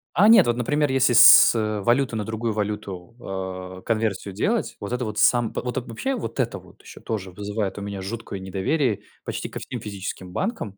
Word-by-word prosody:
А 195 +7 +5
нет, 225 - +7
вот 120 - +1
например, 145 +4 0
если 130 -2 +3
с, 120 0 +9
э, 110 -2 -1
валюты 120 +3 +1
на 110 - -2
другую 110 +1 -3
валюту, 100 -3 -5 0.6
э, - - -16
конверсию 110 -3 -1
делать. 215 - -1
Вот 100 +1 -6
это 125 0 -2
вот 105 -1 -4
сам 120 +1 +3
во - - -3
вот 125 +1 -4
вообще, 190 - -3
вот 230 - -6
это - - 0
вот, - - -19
еще - - -13
тоже 95 -4 -4
вызывает 105 +1 -4
у - - -5
меня 100 -1 -5
жуткое 100 0 -6
недоверие, 100 - -1 0.2
почти - - -4
ко - - -7
всем - - -6
физическим 95 -2 -7
банкам. 185 - -3
110 Hz, 200 wpm, -23 LUFS, 100-125 Hz, 0.6 s, с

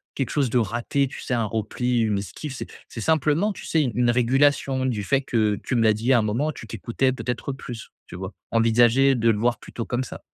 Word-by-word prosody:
quelque 135 - -2
chose 140 -4 +1
de 125 - +1
raté, 120 +5 0
tu 135 - -9
sais - - -3
un 115 -2 0
repli, 115 +3 -1
une 105 -3 +1
esquive, 130 - -7
c'est - - -6 0.2
c'est 115 - -7
simplement 160 - +2
tu - - -10
sais? 160 - +2
Une 120 -1 +1
régulation, 130 +2 +2
du 115 -6 -1
fait 135 +6 +1
que 110 -5 +1
tu - - -2
me 115 - +3
l'as 110 -1 +5
dit 115 +5 +1
à 120 - +5
un - - +1
moment, 120 +9 0
tu 115 - -10
t'écoutais 115 +5 -1
peut-être 125 +1 -4
plus, 120 -4 -9 0.2
tu - - -10
vois? 95 +2 -6 0.2
Envisager 120 +4 +4
de 115 -1 +2
le 105 - -1
voir 120 +2 +1
plutôt 115 - -6
comme 125 +1 -1
ça. - - -9
120 Hz, 230 wpm, -24 LUFS, 115-135 Hz, 0.2 s, l'as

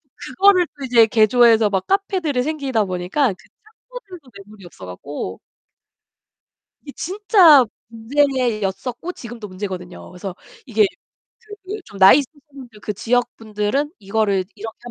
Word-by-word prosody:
그거를 380 -2 +3
또 275 - -6
이제 235 -3 +5
개조해서 225 -1 +4
막 190 -2 -2
카페들이 375 -9 0
생기다 275 -8 -1
보니까 185 +9 -1
그 - - -20 0.4
창고들도 380 - -11 0.2
매물이 205 -3 -15
없어 95 - -12
갖고 115 +11 -7 1.4
이게 280 - -10
진짜 370 - +5 0.2
문제였었고 245 - -2
지금도 230 - -9
문제거든요. 185 -2 -8
그래서 180 +1 -7 0.3
이게 220 -3 +2 0.8
그 415 +3 -6
좀 200 - -13
나이 190 +9 +8
있으신 290 +2 -8
분들 245 -6 -13
그 210 - -4
지역 245 +4 0
분들은 220 +7 -2
이거를 200 -2 0
이렇게 220 +1 -8
235 Hz, 305 characters per minute, -20 LUFS, 205-290 Hz, 1.4 s, 나이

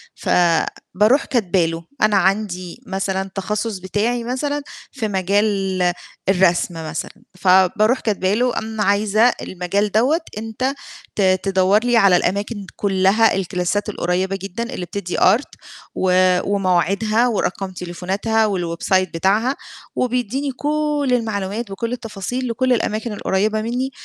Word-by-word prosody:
فباروح 185 - +1
كاتبة 190 -8 +1
له 165 +1 -4 0.2
أنا 215 -1 +4
عندي 190 -2 -1
مثلًا 190 0 -2
تخصُّص 210 +2 -2
بتاعي 220 +6 -1
مثلًا 285 +4 -2 0.3
في 225 -5 -3
مجال 195 -1 0 0.5
الرسم 180 -2 +3 0.2
مثلًا، - - -4 0.3
فباروح 190 +6 +4
كاتبة 200 -3 0
له 245 +2 +1
أنا 220 -1 -2
عايزة 205 +2 +2 0.2
المجال 190 +3 -1
دوّة 270 +10 +2 0.2
أنت 225 +5 -2 0.4
ت 205 - 0
تدوّر 190 +1 +3
لي 240 -1 +3
على 195 -4 +6
الأماكن 200 +3 -1
كُلّها، 195 +3 +3
الكلاسات 190 +2 -1
القريّبة 185 0 -1
جدًا 200 +4 -4
اللي 180 - -4
بتدّي 180 -1 -4
art 215 +9 +3 0.6
آآ 185 0 +4
ومواعيدها 200 +4 +1
ورقم 195 -3 -2
تليفوناتها 190 +5 -1
والwebsite 185 0 0
بتاعها 210 +10 +1 0.4
وبيدّيني 250 +3 -1
كل 295 +1 -1
المعلومات 215 -2 -2
بكل 230 +5 -3
التفاصيل 240 +2 -4
لكل 255 +2 +1
الأماكن 220 -1 -1
القريّبة 210 +2 0
منّي 250 +4 -2
205 Hz, 120 wpm, -20 LUFS, 185-230 Hz, 0.6 s, على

